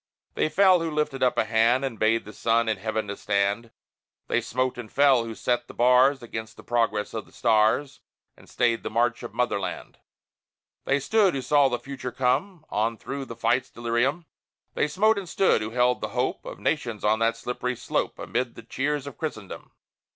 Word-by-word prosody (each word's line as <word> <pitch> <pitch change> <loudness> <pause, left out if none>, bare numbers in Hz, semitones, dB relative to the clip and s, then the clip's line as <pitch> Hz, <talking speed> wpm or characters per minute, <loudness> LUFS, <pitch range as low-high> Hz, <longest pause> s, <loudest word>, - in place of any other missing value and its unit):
They - - 0
fell, 185 0 +5
who 165 0 -2
lifted 150 -3 -2
up 125 - +2
a - - +2
hand 115 +4 +3
And 115 -5 -5
bade 115 +1 +2
the 105 - -10
sun 115 0 +1
in 110 -2 0
heaven 110 +1 -3
to 100 - -4
stand; 100 +3 0 0.6
They 120 - +2
smote 130 +2 -2
and 110 -3 -8
fell, 135 -4 +4
who 115 -1 -6
set 120 +1 -1
the - - -12
bars 125 +2 +4
Against 110 -1 -7
the - - -12
progress 115 -3 0
of 110 - -5
the - - -20
stars, 110 +5 +2 0.4
And - - -19
stayed 120 -1 +1
the - - -4
march 120 +1 +1
of 120 -2 -8
Motherland. 120 -6 -2 0.9
They 140 - +2
stood, 200 +3 +2
who 135 - -3
saw 145 -1 +4
the 120 - -1
future 130 +1 -7
come 140 - -1
On 115 +2 0
through 140 +3 -5
the 115 - -8
fight's 120 +2 +1
delirium; 120 +8 -1 0.5
They - - +1
smote 205 +8 +2
and 185 -3 -8
stood, 195 - +2
who 110 - -3
held 125 +1 +1
the - - -2
hope 125 - -1
Of - - -7
nations 120 -9 -2
on 110 +1 +2
that 115 0 +1
slippery 125 +1 -3
slope, - - -2
Amid 120 0 -3
the 115 - -11
cheers 140 +4 -2
of 140 - -9
Christendom! 110 - -6
120 Hz, 195 wpm, -25 LUFS, 115-140 Hz, 0.9 s, fell